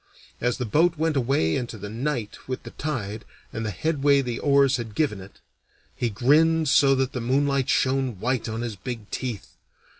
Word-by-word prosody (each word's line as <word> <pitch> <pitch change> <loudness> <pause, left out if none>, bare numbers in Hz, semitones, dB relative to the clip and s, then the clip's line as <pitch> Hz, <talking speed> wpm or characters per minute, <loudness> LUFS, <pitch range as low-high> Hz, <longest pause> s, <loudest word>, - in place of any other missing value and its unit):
As 120 0 0
the 125 - -2
boat 165 +8 +2
went 160 0 0
away 120 - +1
into 120 -2 -4
the 105 0 -7
night 120 0 -4
with 130 -1 -4
the - - -9
tide 110 -8 -4 0.3
and 115 - -3
the 110 - -2
headway 140 - +2
the 120 -3 -4
oars 140 -2 +4
had 115 -3 -7
given 120 -11 0
it, 95 +2 -14 0.5
he 120 - -1
grinned 155 +8 +3
so 135 -1 +5
that 135 0 -1
the 125 - -3
moonlight 135 +2 +1
shone 130 -5 +1
white 125 +1 -1
on 110 +1 -3
his 120 -3 -4
big 110 +1 -7
teeth. 125 -6 -5
130 Hz, 185 wpm, -25 LUFS, 115-140 Hz, 0.5 s, so